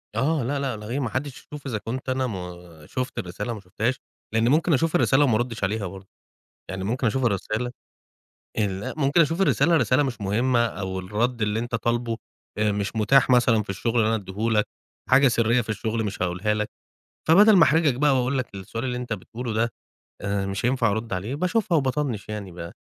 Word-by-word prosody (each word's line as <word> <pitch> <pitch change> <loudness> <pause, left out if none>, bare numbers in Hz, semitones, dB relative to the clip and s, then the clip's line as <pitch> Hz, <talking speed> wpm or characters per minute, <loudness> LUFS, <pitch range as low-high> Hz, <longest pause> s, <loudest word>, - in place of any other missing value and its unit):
آه، 140 +4 +1
لا، 140 +4 -1
لا، 135 -5 -2
لا، 105 0 -9
إيه! 130 +4 -1
ما 125 - -1
حدش 130 +2 -3
يشوف 150 -1 -10
إذا 125 -5 -2
كنت 125 +5 -5
أنا 130 0 0
ما 90 -6 -8
شُفت 130 -1 -3
الرسالة 90 +6 -4
ما 110 - -7
شُفتهاش، 110 +6 -1 0.4
لأن 110 +2 +3
ممكن 155 +3 +3
أشوف 160 +4 +1
الرسالة 135 +2 +4
وما 125 -6 +3
أردش 115 -1 -2
عليها 100 0 -1
برضه. 95 +1 -10 0.6
يعني 95 0 -4
ممكن 120 +5 0
أشوف 130 +4 0
الرسالة؟ 110 +3 -1 0.9
ال 100 -3 0
لأ، - - -5
ممكن 145 +2 +3
أشوف 165 +3 +2
الرسالة، 170 -3 +3
الرسالة 140 -2 +3
مش 130 -5 -3
مهمة 120 +4 +2
أو 95 -4 -4
الرد 110 +5 -1
اللي 105 +1 0
أنت 120 +1 -4
طالبه 120 0 0 0.4
آآ 105 -1 +2
مش 100 +2 -3
متاح 130 +5 +4
مثلًا 120 -3 +4
في 100 - -8
الشغل 115 +4 0
إن 110 - +3
أنا 115 - +2
أديه 95 -3 -8 0.2
لك. 105 -1 +2 0.4
حاجة 135 +1 +6
سرية 120 0 +2
في 110 - -6
الشغل 110 +1 -2
مش 100 -3 -3
هاقولها 90 +4 0
لك. 105 0 -2 0.6
فبدل 205 +6 +7
ما 175 - +8
أحرجك 160 -4 +4
بقى 140 +1 +3
وأقول 130 +2 0
لك 125 -5 -4
السؤال 100 +4 -5
اللي 125 -1 -2
أنت 125 -2 -3
بتقوله 115 +4 -5
ده، 115 +2 +1 0.5
آآ 100 0 -1
مش 100 +4 -2
هينفع 125 -3 +2
أرد 110 +1 -3
عليه 100 +8 -2
باشوفها 185 +4 +1
وباطنِّش 130 -6 -1
يعني، 105 -3 -5
ب 85 -1 -8
115 Hz, 205 wpm, -24 LUFS, 105-130 Hz, 0.9 s, ما